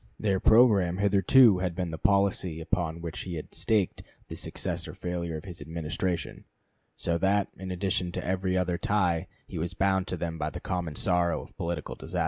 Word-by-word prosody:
Their 100 -3 +1
programme 105 -7 +5
hitherto 100 +2 +5
had 90 -2 -2
been 90 -3 -2
the 80 - -4
policy 100 -5 +2
upon 85 0 -2
which 85 -2 -5
he 90 -2 -5
had 75 - -7
staked 105 -5 0 0.3
the - - -5
success - - -3
or - - -8
failure 85 -2 -3
of 75 - -10
his 90 -5 -8
Administration, 85 +3 -3 0.5
so 85 0 0
that 100 +2 +2
in 95 -1 -7
addition 90 -1 -1
to - - -4
every 95 0 0
other 90 -1 0
tie 90 -6 +1 0.2
he - - -6
was 85 +2 -3
bound 95 -1 +1
to 90 - -3
them 80 -1 -4
by 75 - -1
the 90 - -7
common 90 -5 -3
sorrow 90 -1 +1
of - - -17
political 85 -2 -3
disaster. - - -5
90 Hz, 190 wpm, -28 LUFS, 85-95 Hz, 0.5 s, programme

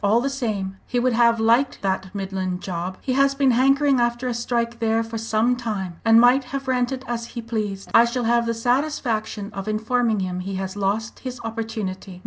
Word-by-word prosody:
All 210 +3 +4
the 275 +3 -1
same, 205 -8 -3
he 250 - -2
would 250 0 +2
have 235 0 +4
liked 235 +4 +2
that 190 -1 -1
Midland 190 -2 -3
job! 180 0 -4
He 260 - -1
has 275 +1 +3
been 275 -2 +3
hankering 275 +2 +3
after 240 +1 0
a 245 - -1
strike 235 0 -2
there 225 0 +1
for 225 0 -5
some 225 +2 +1
time, 200 -8 -4
and 225 0 +6
might 250 +3 +5
have 275 +1 -5
ranted 255 +1 -1
as 235 -1 -3
he - - 0
pleased. 210 -4 -4
I 230 - +7
shall 240 +1 -2
have 235 0 +2
the 230 - 0
satisfaction 230 -4 -1
of 195 0 -6
informing 220 0 0
him 180 -1 -3
he 190 +1 -4
has 190 0 -4
lost 205 +3 -2
his 255 -1 -6
opportunity. 220 -5 -5
230 Hz, 200 wpm, -23 LUFS, 200-245 Hz, -, I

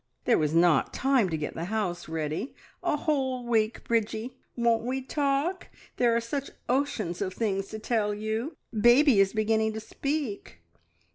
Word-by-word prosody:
There - - +4
was 155 0 0
not 170 -3 +4
time 260 -7 +2
to 160 - -1
get 150 - -4
the 165 - -4
house 190 -5 -2
ready. 160 - -3 0.3
A - - +1
whole 265 -5 -1
week, 225 -1 +1
Bridgie! 230 +2 -1 0.2
Won't 235 -1 +2
we 260 +2 -2
talk! 285 +6 -1 0.3
There 235 -2 +3
are - - +3
such 270 +4 -4 0.2
oceans 240 -10 -1
of 190 -2 -2
things 195 -3 -1
to 220 - -6
tell 215 -1 0
you. 220 +7 -3 0.2
Baby 240 +2 +5
is 195 -1 +4
beginning 220 0 +1
to 220 - -4
speak!" 225 - -4
225 Hz, 160 wpm, -28 LUFS, 195-260 Hz, 0.3 s, Baby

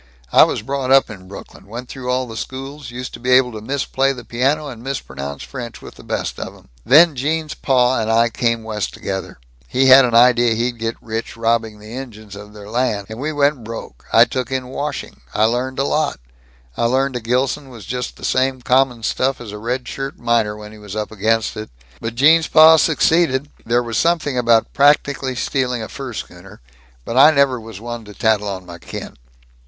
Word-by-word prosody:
I - - +8
was - - -3
brought 135 +1 -3
up 135 -3 +5
in 95 -3 -11
Brooklyn 100 0 -12
went 120 +4 -7
through 125 -1 -7
all 130 0 0
the 115 -2 -9
schools 135 +3 -7
used 125 +1 -7
to - - -8
be 125 - -4
able 125 -1 +5
to 110 -2 -8
misplay 135 +2 0
the 125 -3 -10
piano 140 +6 0
and 120 -5 -9
mispronounce 70 - -6
French 120 -5 -8
with - - -11
the - - -15
best - - -3
of - - -6
'em. - - -20
Then 155 +4 +6
Gene's 155 +4 -2
pa 130 -2 +2
and 110 0 -2
I 115 +1 +4
came 115 -1 -1
West 105 -3 -4
together - - -5 0.3
he 130 - +2
had 130 +1 +9
an 120 -2 0
idea 120 -1 +5
he'd 120 +1 -2
get 115 0 -2
rich 115 0 -5
robbing 115 -1 0
the 105 +2 -11
Injuns 110 -6 -8
of 105 +1 -11
their 105 -1 -11
land. 110 -3 -1
And 110 - -7
we 150 +3 -2
went 145 -3 +1
broke. 110 - -9
I - - +7
took 130 -1 -4
in 130 -1 -3
washing. 145 +3 -5
I 105 - +3
learned 125 +4 0
a 135 - +1
lot. 150 - 0 0.6
I - - 0
learned 130 +2 +1
a - - -1
Gilson 130 +4 -1
was 115 -6 -11
just 125 +3 -4
the - - -8
same 130 -1 0
common 125 -2 +2
stuff 130 +4 0
as 115 -4 -8
a 105 - -7
red 125 +3 -3
shirt 135 0 -5
miner, 115 -3 0
when 105 0 -10
he 110 - -13
was 105 -1 -9
up 105 0 -3
against 110 +1 0
it. 110 0 -6 0.3
But 115 0 -5
Gene's 160 +5 +5
pa 160 0 +8
succeeded 155 -3 +2 0.2
there 120 +1 +2
was 115 -1 -2
something 165 -5 +1
about 115 -2 +2
practically 140 -2 +2
stealing 125 -1 -1
a - - -6
fur 135 -3 -7
schooner 95 0 -9 0.5
but 115 - -3
I 140 +3 +9
never 140 -5 +2
was 110 -3 -10
one 120 0 -6
to 105 -1 -12
tattle 110 -2 +1
on 95 -2 -5
my 85 -1 -10
kin. 85 - -8
125 Hz, 210 wpm, -19 LUFS, 110-135 Hz, 0.6 s, had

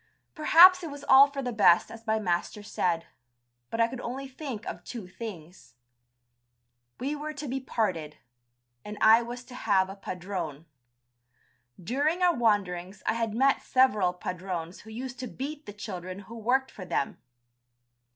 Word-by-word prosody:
Perhaps 355 +3 +7
it 335 - -5
was 285 0 -9
all 270 +1 +9
for 280 -1 -5
the 245 -1 -3
best 180 -5 +4
as 225 0 -12
my 220 0 +2
master 185 +1 -2
said, 170 -5 -1 0.6
but 225 - -4
I 230 - +5
could 250 +1 -7
only 265 +3 -5
think 260 -4 -7
of - - -6
two 235 -6 -7
things. 185 -4 -10 1.2
We 280 +4 -2
were 305 +1 -5
to 295 0 -6
be 265 +2 -2
parted, 185 - -2 0.7
and 210 0 -7
I 220 +2 +7
was 240 +1 -7
to 250 - -14
have 195 -6 +1
a - - -8
padrone. 180 -6 -5 1.1
During 290 - 0
our 355 -1 +5
wanderings 195 - 0
I - - +2
had 225 -2 -2
met 270 +3 +3
several 210 -9 +3
padrones 180 -1 -5
who 220 - -14
used 250 +3 -7
to 255 - -4
beat 290 +5 -6
the - - -5
children 185 -2 -7
who 225 +4 -11
worked 255 +4 0
for 195 - -9
them. 160 -6 -2
225 Hz, 160 wpm, -28 LUFS, 185-265 Hz, 1.2 s, all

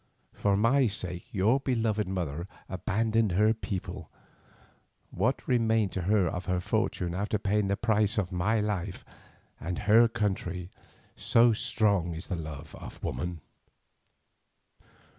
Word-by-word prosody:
For 100 -1 +1
my 125 +5 +4
sake 90 -4 -4
your 110 +7 +3
beloved 110 -6 0
mother 85 -3 -3 0.2
abandoned 110 +2 0
her 105 +4 +4
people, 100 -4 -5 1.0
what 115 +9 -1
remained 115 -5 +2
to 95 - -3
her 100 +2 +2
of 90 +2 -4
her 90 0 0
fortune 90 0 -1
after 100 +3 -1
paying 105 0 0
the 100 0 0
price 110 -1 +1
of 100 -3 0
my 100 +5 +1
life, 100 -3 -3 0.5
and 90 +3 -4
her 115 +3 +7
country, 95 -5 -2 0.4
so 115 0 +4
strong 105 -7 +1
is 80 - -6
the - - 0
love 75 -2 -7
of - - -10
woman. 90 -2 -3
100 Hz, 130 wpm, -29 LUFS, 90-110 Hz, 1.0 s, her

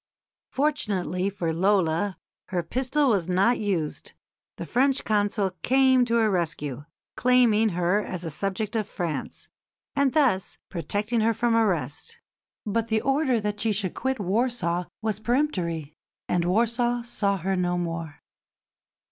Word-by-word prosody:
Fortunately 200 -10 0
for 170 -5 -2
Lola, 185 0 +1 0.3
her 175 -2 -2
pistol 270 - +1
was 190 -6 +1
not 195 +7 +3
used. 185 -8 -2 0.4
The - - -6
French 270 +2 +2
Consul 205 -2 +1
came 260 -1 +4
to 235 -1 0
her 220 -2 +3
rescue, 150 -6 -2 0.3
claiming 240 -3 +4
her 180 +4 +2
as 180 -1 -5
a 165 - -3
subject 195 +7 -3
of 215 -2 0
France, 175 -7 -4 0.5
and 280 -2 +2
thus 255 -12 +2
protecting 210 +6 -1
her 225 +1 +2
from 235 +1 +1
arrest. 215 - 0 0.5
But 220 +2 -1
the 220 -1 +1
order 270 -3 +2
that 210 0 -3
she 225 - +2
should 195 -3 -1
quit 265 0 -2
Warsaw 195 -3 0 0.2
was 215 -2 -1
peremptory, 185 - -1 0.3
and 175 -1 +1
Warsaw 235 +5 +1
saw 200 -4 -1
her 190 +2 -1
no 180 -1 0
more. 165 -3 -4
205 Hz, 140 wpm, -26 LUFS, 180-240 Hz, 0.5 s, came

